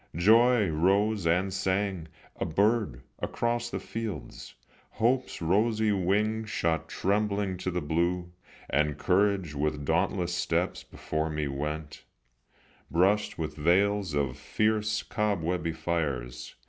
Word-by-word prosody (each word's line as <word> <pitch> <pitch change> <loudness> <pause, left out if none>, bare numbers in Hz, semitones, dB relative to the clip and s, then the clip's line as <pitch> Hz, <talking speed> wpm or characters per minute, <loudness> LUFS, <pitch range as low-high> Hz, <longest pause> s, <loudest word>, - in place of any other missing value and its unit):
Joy 110 +5 +5
rose 95 +4 +2
and 90 +3 +1
sang, 95 -3 -1 0.3
a - - -2
bird, 100 - +1 0.2
across 120 0 -1
the - - -3
fields, 110 -8 -6 0.4
Hope's 125 -4 0
rosy 110 +5 +2
wings 105 +3 0
shot 85 -5 0
trembling 100 -1 0
to 90 - -3
the 90 -3 -2
blue, 85 +3 0 0.4
And 75 +1 +1
Courage 95 -2 +1
with 75 0 -2
dauntless 90 +3 0
steps - - -1
before 80 +1 -3
me 75 -1 -2
went, 75 +2 -4 0.9
Brushing 95 -1 +2
the 75 0 -8
veils 95 +1 +2
of 70 -3 -1
fierce 105 -1 0
cobwebby 90 -5 -1
fires. 65 -8 -3
90 Hz, 115 wpm, -28 LUFS, 80-105 Hz, 0.9 s, Joy